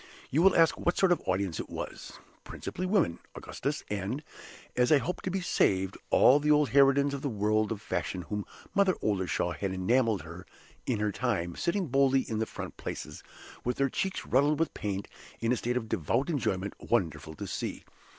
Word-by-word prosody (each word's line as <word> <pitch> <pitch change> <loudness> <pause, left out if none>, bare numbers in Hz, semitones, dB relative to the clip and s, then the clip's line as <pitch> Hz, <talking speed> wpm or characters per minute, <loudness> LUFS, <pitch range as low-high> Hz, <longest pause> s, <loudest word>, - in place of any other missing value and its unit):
You 150 - +3
will 195 +1 +6
ask 165 -1 +4
what 175 - 0
sort 190 -2 +4
of 175 - +3
audience 95 -2 0
it - - -5
was. - - -6 0.3
Principally 185 +2 -5
Women, 180 - +2 0.2
Augustus - - -4
and, 105 +8 -3 0.5
as 125 +2 +3
I 150 - +8
hope 180 +5 -3
to - - -3
be 190 +1 -1
saved, 95 - +1
all 135 +4 +6
the 150 +1 0
old 150 -1 +4
harridans 140 +1 +5
of 140 - -4
the 140 - -1
world 110 0 +1
of 110 -1 -4
fashion 90 -2 -3
whom 105 +6 -3 0.3
Mother 195 -2 +3
Oldershaw 95 -4 0
had 100 -2 -3
enameled 110 - +1 0.6
in 120 -5 0
her 105 -1 +1
time, 95 -7 -1
sitting 180 +2 0
boldly 135 -1 +3
in 110 -3 -3
the 110 - 0
front - - -7
places, - - -6 0.4
with 125 0 -1
their 140 0 +2
cheeks 190 +8 -2
ruddled 145 +3 +3
with 165 - 0
paint, 100 -1 -3 0.3
in 115 +1 0
a - - +4
state 120 +1 -1
of 115 -3 -3
devout 115 - 0
enjoyment 100 - -1
wonderful 80 -8 -1
to - - -6
see! - - -4
125 Hz, 190 wpm, -29 LUFS, 100-150 Hz, 0.6 s, I